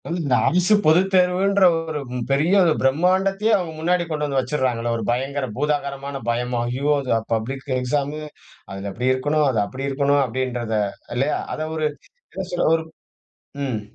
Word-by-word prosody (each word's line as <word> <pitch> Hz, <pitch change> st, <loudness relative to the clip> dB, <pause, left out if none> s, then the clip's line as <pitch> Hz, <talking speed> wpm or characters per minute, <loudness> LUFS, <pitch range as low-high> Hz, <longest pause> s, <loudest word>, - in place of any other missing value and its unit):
இந்த 165 Hz, -7 st, 0 dB
அரசு 180 Hz, +4 st, +3 dB
பொதுத்தேர்வுன்ற 185 Hz, +3 st, +3 dB, 0.2 s
ஒரு 160 Hz, -2 st, -4 dB, 0.3 s
பெரிய 150 Hz, +7 st, +2 dB
ஒரு 170 Hz, -3 st, +4 dB
பிரம்மாண்டத்தையே 190 Hz, +9 st, +2 dB
அவங்க 175 Hz, -4 st, -4 dB
முன்னாடி 175 Hz, +2 st, +1 dB
கொண்டு 150 Hz, -2 st, -1 dB
வந்து 140 Hz, -2 st, 0 dB
வச்சுடுறாங்கல்ல 125 Hz, -3 st, -1 dB
ஒரு 115 Hz, -, -4 dB
பயங்கர 135 Hz, +3 st, -1 dB
பூதாகரமான 140 Hz, -1 st, -2 dB
பயம். 120 Hz, +1 st, -1 dB
"ஐயோ! 135 Hz, +5 st, 0 dB
இது 130 Hz, -, -3 dB, 0.2 s
பப்ளிக் 130 Hz, +5 st, -3 dB
எக்ஸாம் 140 Hz, +3 st, -1 dB, 0.5 s
அதில் 100 Hz, 0 st, -5 dB
அப்படி 125 Hz, +6 st, 0 dB
இருக்கணும் 145 Hz, +3 st, +1 dB
அது 115 Hz, -5 st, +1 dB
அப்படி 130 Hz, +6 st, -6 dB
இருக்கணும்." 140 Hz, +1 st, +2 dB
அப்படின்றத 120 Hz, -2 st, -2 dB, 0.4 s
இல்லையா? 135 Hz, +5 st, +1 dB, 0.2 s
அத 155 Hz, 0 st, -3 dB
ஒரு 155 Hz, -1 st, -1 dB, 0.5 s
என்ன 190 Hz, -, -4 dB
சொல்ல, 175 Hz, -, +1 dB
ஒரு 160 Hz, -, -2 dB, 0.8 s
ம். 125 Hz, -6 st, -2 dB
140 Hz, 145 wpm, -22 LUFS, 130-165 Hz, 0.8 s, ஒரு